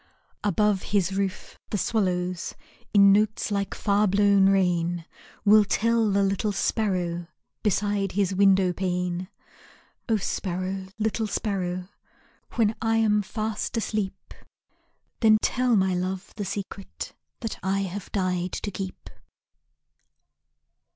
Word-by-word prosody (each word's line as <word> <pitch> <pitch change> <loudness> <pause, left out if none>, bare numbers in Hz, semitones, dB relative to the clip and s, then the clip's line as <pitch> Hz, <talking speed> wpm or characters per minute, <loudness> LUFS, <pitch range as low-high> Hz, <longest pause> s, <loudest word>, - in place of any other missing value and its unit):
Above 205 0 +2
his 195 -2 0
roof 195 -1 -3
the 210 - -1
swallows, 180 -4 -1 0.4
In 200 -1 +7
notes 210 +1 +2
like 200 -1 -1
far 205 0 +2
blown 200 0 +4
rain, 175 -3 +1 0.4
Will 210 +1 +7
tell 230 +2 +2
the 200 0 +2
little 195 +2 0
sparrow 180 -5 -1 0.3
Beside 205 -2 0
his 195 0 +1
window 190 -1 +4
pane. 180 0 -2 0.8
O 225 - +3
sparrow, 190 0 -3
little 220 0 -1
sparrow, 185 -4 -2 0.7
When 220 -2 +2
I 225 0 +2
am 210 -2 +3
fast 215 +2 -3
asleep, 210 -3 -3 0.9
Then 215 -2 +6
tell 250 +1 +2
my 190 -2 +2
love 185 +2 -3
the 205 -3 -4
secret 195 0 -6 0.3
That 225 -3 -4
I 195 +1 0
have 195 +1 -5
died 185 -2 -1
to 205 - -3
keep. 190 0 -6
195 Hz, 115 wpm, -26 LUFS, 185-210 Hz, 0.9 s, In